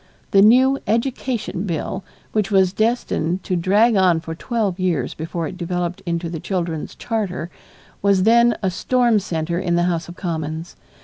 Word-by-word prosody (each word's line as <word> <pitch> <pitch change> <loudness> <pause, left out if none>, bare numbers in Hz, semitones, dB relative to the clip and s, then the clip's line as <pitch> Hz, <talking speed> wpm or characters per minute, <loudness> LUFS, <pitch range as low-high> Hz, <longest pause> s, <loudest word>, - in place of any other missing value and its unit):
The 195 - +6
new 260 +6 +5
Education 230 -3 -1
Bill 180 +3 -3 0.3
which 210 -2 0
was 190 -2 +3
destined 195 -6 0
to 185 - -1
drag 205 +7 +3
on 185 -4 +4
for 165 0 -6
twelve 205 0 -2
years 170 -9 0
before 165 +1 -4
it 185 - -8
developed 175 0 -3
into 170 0 -1
the 165 -1 -5
children's 170 -3 -3
charter, 195 -7 -3 0.5
was 195 -2 +3
then 235 +2 +5
a 190 - +1
storm 240 +3 +2
center 170 -2 -2
in 175 -2 0
the 175 - +2
House 170 -2 -1
of 175 - -9
Commons. 160 -1 -4
185 Hz, 165 wpm, -21 LUFS, 170-215 Hz, 0.5 s, The